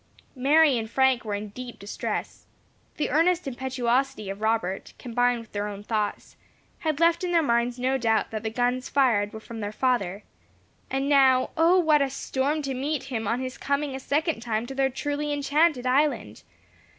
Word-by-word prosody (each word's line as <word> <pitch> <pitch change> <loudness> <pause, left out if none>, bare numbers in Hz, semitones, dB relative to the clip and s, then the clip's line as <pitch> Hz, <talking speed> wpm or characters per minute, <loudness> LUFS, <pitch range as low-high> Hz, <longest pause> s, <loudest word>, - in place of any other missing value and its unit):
Mary 280 0 +4
and 220 -1 -5
Frank 265 0 +2
were 210 -2 -3
in 205 +1 -5
deep 245 +3 -8
distress. 200 +1 -5 0.5
The 300 - -1
earnest 340 +1 +2
impetuosity 255 -3 -1
of 195 +2 -8
Robert, 220 -4 -1
combined 245 0 0
with 225 - -16
their 205 0 -2
own 205 0 -7
thoughts, 210 -1 -3 0.4
had 310 -2 -1
left 335 +1 +3
in 360 - -1
their 335 -2 +3
minds 235 -2 +1
no 260 +2 0
doubt 225 -2 +1
that 215 -1 -3
the 220 - -2
guns 245 +2 -1
fired 225 -7 +2
were 220 - -8
from 225 +1 -9
their 205 -1 -3
father; 215 -5 0 0.7
and 270 +1 -1
now, 265 -3 +4
O 335 +3 +4
what 310 -4 +4
a 275 - +1
storm 275 +3 -2
to 275 -1 -2
meet 280 +2 -2
him 225 -3 -2
on 235 +4 0
his 255 0 -6
coming 280 0 -1
a - - -4
second 305 +2 0
time 230 -1 -2
to 270 - -7
their 270 0 +1
truly 290 +3 -3
enchanted 290 -1 +2
island! 255 - +1
255 Hz, 185 wpm, -26 LUFS, 225-285 Hz, 0.7 s, Mary